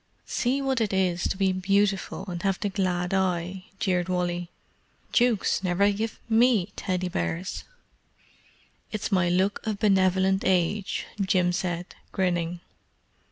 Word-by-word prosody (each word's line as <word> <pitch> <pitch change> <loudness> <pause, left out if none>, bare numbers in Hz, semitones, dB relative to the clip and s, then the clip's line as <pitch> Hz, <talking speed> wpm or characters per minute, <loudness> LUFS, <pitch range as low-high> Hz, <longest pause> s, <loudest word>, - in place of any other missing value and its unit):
"See 265 +2 0
what 265 -3 +1
it 210 -3 0
is 180 -2 +1
to - - -2
be 190 -1 +2
beautiful 195 +1 0
and 175 -2 -4
have 195 -1 0
the 205 - -1
glad 185 -2 -1
eye!" 185 0 -1
jeered 180 -2 0
Wally. 175 -1 -1 0.6
"Dukes 235 -6 +2
never 190 +3 +3
give 215 +2 -3
me 225 -4 +3
Teddy 185 -2 -2
bears!" 180 0 -3 1.3
"It's 215 0 -3
my 185 -3 +3
look 190 +3 +1
of 215 -2 -1
benevolent 190 -2 +3
age," 190 +2 +1 0.2
Jim 185 -2 +2
said, 175 0 -3 0.2
grinning. 175 -2 -1
190 Hz, 130 wpm, -26 LUFS, 180-200 Hz, 1.3 s, never